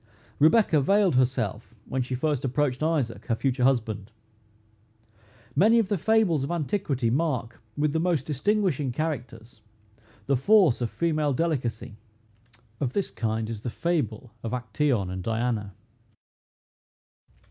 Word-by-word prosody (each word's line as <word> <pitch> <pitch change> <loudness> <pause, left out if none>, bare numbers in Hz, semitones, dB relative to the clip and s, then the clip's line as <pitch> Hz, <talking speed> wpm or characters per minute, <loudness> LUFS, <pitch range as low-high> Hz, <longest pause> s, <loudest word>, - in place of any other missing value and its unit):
Rebecca 160 0 +4
veiled 195 +4 +3
herself 125 -4 0
when 130 - -2
she 125 +1 -3
first 145 0 -1
approached 135 0 0
Isaac, 155 -7 -1
her 115 - +1
future 130 +1 -1
husband. 110 -5 0 1.4
Many 215 +10 +5
of 220 -4 +2
the 205 - +2
fables 210 -8 +2
of 140 - -3
antiquity 155 - -1
mark, 130 -6 -1 0.2
with 150 0 +1
the 160 - +1
most 165 -5 0
distinguishing 155 - 0
characters, 120 -6 -5 0.6
the 140 - +2
force 165 - +4
of 120 - 0
female 155 -4 0
delicacy. 125 -7 -2 0.8
Of 130 -3 -2
this 200 - -1
kind 110 -1 -2
is 110 -2 -6
the 120 - -3
fable 125 - -2
of 115 - -5
Actæon 120 -4 0
and 95 0 -4
Diana. 110 -2 -2
130 Hz, 130 wpm, -26 LUFS, 115-160 Hz, 1.4 s, Many